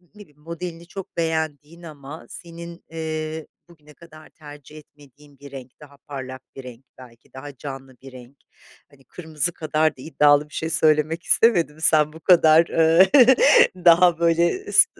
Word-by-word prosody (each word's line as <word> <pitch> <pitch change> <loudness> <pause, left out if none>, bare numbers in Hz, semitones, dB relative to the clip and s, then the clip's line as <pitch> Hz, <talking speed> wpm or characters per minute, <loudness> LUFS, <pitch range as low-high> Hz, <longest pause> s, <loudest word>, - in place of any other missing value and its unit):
ne 210 - -15
bileyim 150 -6 -19
modelini 170 +1 -9
çok 195 +1 -11
beğendiğin 160 0 -4
ama 150 -1 -12
senin, 170 0 -12
ııı, 160 -1 -6 0.2
bugüne 150 -3 -20
kadar 155 -1 -17
tercih 150 -1 -15
etmediğin 145 -1 -20
bir 140 -1 -14
renk, 130 -2 -13
daha 145 -2 -17
parlak 130 -3 -10
bir 135 - -10
renk 125 +1 -13
belki, 120 -2 -18
daha 140 +1 -11
canlı 135 -1 -10
bir 135 0 -13
renk, 130 +2 -15 0.5
hani 135 -1 -23
kırmızı 160 -1 -3
kadar 155 -1 -2
da - - -13
iddialı 150 0 +1
bir - - -21
şey 160 - -5
söylemek 160 0 0
istemedim, 170 -9 +1
sen 155 -1 +2
bu 160 - -13
kadar, 165 -1 +4
ııı, 165 +3 +4 0.8
daha 170 0 +4
böyle 170 - 0
s, - - +6
155 Hz, 155 wpm, -21 LUFS, 145-165 Hz, 0.8 s, s